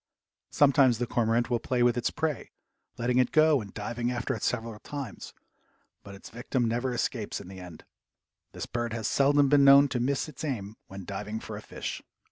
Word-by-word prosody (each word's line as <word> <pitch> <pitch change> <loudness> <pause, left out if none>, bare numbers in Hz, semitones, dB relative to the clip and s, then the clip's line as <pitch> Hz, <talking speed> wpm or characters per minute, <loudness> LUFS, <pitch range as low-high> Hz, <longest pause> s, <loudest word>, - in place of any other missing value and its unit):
Sometimes 135 -4 +4
the 120 - -1
cormorant 120 0 0
will 120 - +2
play 120 +1 0
with 120 -1 +3
its 120 - 0
prey, 155 -4 -3 0.5
letting 120 +1 +1
it 125 - +2
go 155 -3 +4
and 100 -2 -10
diving 120 +3 -3
after 125 +2 -2
it 110 - -6
several 115 -3 -2
times, 140 -5 -7 0.7
but 100 - -11
its 100 - -13
victim 125 +1 -2
never 120 +3 -1
escapes 115 -2 -2
in - - -11
the 95 0 -10
end. 90 -3 -11 0.7
This - - -6
bird 120 -1 -3
has 110 -2 -2
seldom 140 +1 +3
been 140 0 +5
known 140 +1 +7
to 125 - -2
miss 135 +5 0
its 150 -2 -9
aim 110 -8 -4
when 95 -1 -9
diving 105 +3 -5
for - - -8
a - - -7
fish. - - -6
120 Hz, 195 wpm, -28 LUFS, 110-135 Hz, 0.7 s, known